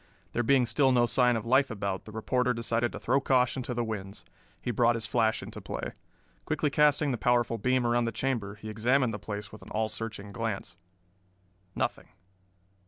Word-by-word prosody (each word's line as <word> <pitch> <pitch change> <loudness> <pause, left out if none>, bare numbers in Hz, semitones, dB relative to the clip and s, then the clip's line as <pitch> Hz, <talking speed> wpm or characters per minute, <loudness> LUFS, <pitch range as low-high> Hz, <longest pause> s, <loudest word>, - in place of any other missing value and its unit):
There 120 - +1
being 130 +1 +4
still 130 +3 +3
no 120 -1 +4
sign 125 0 +3
of 110 0 -3
life 130 +3 +4
about, 100 -4 -3
the 110 - -10
reporter 125 +3 0
decided 115 0 0
to - - -7
throw 135 +3 +2
caution 130 0 +2
to 125 0 -4
the 120 - 0
winds. 100 -3 -6 0.3
He 120 - -2
brought 120 +1 +3
his 115 -1 -3
flash 110 0 +1
into - - -8
play. - - -5 0.5
Quickly 155 -2 0
casting 150 0 +3
the 120 - -2
powerful 120 -1 +2
beam 130 +2 +2
around 120 0 +2
the 115 - -1
chamber 110 -4 -2
he 105 +1 -10
examined 120 +3 +2
the 105 - -4
place 105 0 -6
with 110 - -11
an - - -12
all 110 0 -1
searching 105 -1 -6
glance. 105 -5 -4 1.0
Nothing. - - -2
120 Hz, 190 wpm, -29 LUFS, 110-125 Hz, 1.0 s, being